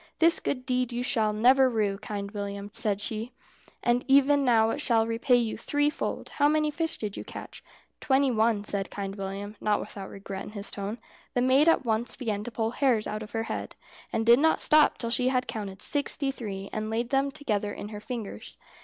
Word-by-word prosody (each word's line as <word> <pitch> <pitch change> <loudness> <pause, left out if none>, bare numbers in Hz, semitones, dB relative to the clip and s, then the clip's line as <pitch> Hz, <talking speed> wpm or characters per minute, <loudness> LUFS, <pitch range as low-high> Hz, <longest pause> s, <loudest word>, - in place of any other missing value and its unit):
"This 335 0 +5
good 255 -2 -3
deed 250 -1 0
you 240 +1 -2
shall 220 -5 +2
never 255 +5 +5
rue, 210 -4 0
Kind 200 -1 -5
William," 200 -1 -5
said 205 -2 -1
she, 220 +3 -3 0.5
"and 240 +1 +2
even 280 +1 +5
now 225 -3 +4
it 290 - -2
shall 230 -5 +3
repay 230 +3 +2
you 235 -2 +1
threefold. 290 +4 -1
How 290 - +2
many 305 0 +2
fish 325 +2 -1
did 210 -2 -4
you - - -6
catch?" - - -9 0.4
"Twenty 270 0 +2
one," 220 -2 +2
said 200 -1 -2
Kind 195 -1 -5
William, 200 +1 -5
not 210 -1 +2
without 195 -1 -7
regret 195 -1 -7
in - - -8
his 205 -1 -3
tone. 205 +3 -4 0.4
The 245 - +2
maid 270 +5 +5
at 330 - +3
once 225 +1 0
began 215 -5 -3
to 240 - -5
pull 225 0 -1
hairs 245 -5 +2
out 215 0 -4
of 210 - -9
her 225 0 -1
head, - - -5 0.4
and 225 - -1
did 235 +2 +7
not 320 +2 +3
stop 305 -1 +5
till 230 -1 -4
she 250 +1 +2
had 255 -1 +1
counted 205 -4 -6
sixty 280 -1 0
three, 200 -6 -6
and 215 0 -3
laid 235 +2 -2
them 275 +1 +2
together 215 -8 -2
in 205 - -7
her 210 -1 -7
fingers. 225 -1 -7
230 Hz, 205 wpm, -27 LUFS, 210-260 Hz, 0.5 s, did